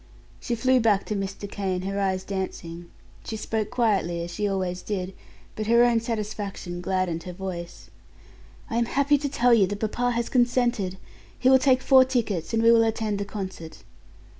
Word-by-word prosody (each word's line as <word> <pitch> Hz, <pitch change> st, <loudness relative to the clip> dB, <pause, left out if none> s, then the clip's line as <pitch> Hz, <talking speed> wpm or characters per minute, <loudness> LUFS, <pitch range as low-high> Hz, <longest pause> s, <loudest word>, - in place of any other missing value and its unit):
She 240 Hz, -, -2 dB
flew 255 Hz, +2 st, +3 dB
back 215 Hz, -4 st, +2 dB
to 210 Hz, -, -3 dB
Mr. 195 Hz, +1 st, -4 dB
Kane, 190 Hz, -2 st, -3 dB
her 195 Hz, +1 st, -2 dB
eyes 190 Hz, -1 st, 0 dB
dancing. 175 Hz, -3 st, -5 dB, 0.3 s
She 220 Hz, -, -5 dB
spoke 215 Hz, 0 st, -2 dB
quietly, 195 Hz, -8 st, 0 dB
as 170 Hz, -, -6 dB
she 205 Hz, +3 st, -1 dB
always 185 Hz, -2 st, -2 dB
did, 190 Hz, -2 st, -4 dB, 0.4 s
but 215 Hz, 0 st, -4 dB
her 235 Hz, +1 st, +5 dB
own 240 Hz, -1 st, +3 dB
satisfaction 210 Hz, -5 st, -4 dB
gladdened 185 Hz, -2 st, -1 dB
her 180 Hz, -, -6 dB
voice. 175 Hz, -2 st, -7 dB, 0.8 s
"I 230 Hz, -, -3 dB
am 235 Hz, -, +2 dB
happy 280 Hz, +3 st, +2 dB
to 285 Hz, 0 st, -2 dB
tell 245 Hz, -2 st, +3 dB
you 205 Hz, -5 st, +5 dB
that 205 Hz, +1 st, -5 dB
papa 240 Hz, +3 st, -1 dB
has 235 Hz, 0 st, -1 dB
consented. 240 Hz, -6 st, +1 dB, 0.4 s
He 260 Hz, -, +3 dB
will 265 Hz, -, +7 dB
take 260 Hz, -1 st, +3 dB
four 265 Hz, -1 st, +7 dB
tickets 235 Hz, -10 st, -2 dB
and 225 Hz, 0 st, +1 dB
we 230 Hz, -, +7 dB
will 230 Hz, -1 st, +6 dB
attend 220 Hz, -2 st, -1 dB
the 200 Hz, -, -2 dB
concert." 190 Hz, -6 st, -7 dB
210 Hz, 185 wpm, -25 LUFS, 190-235 Hz, 0.8 s, will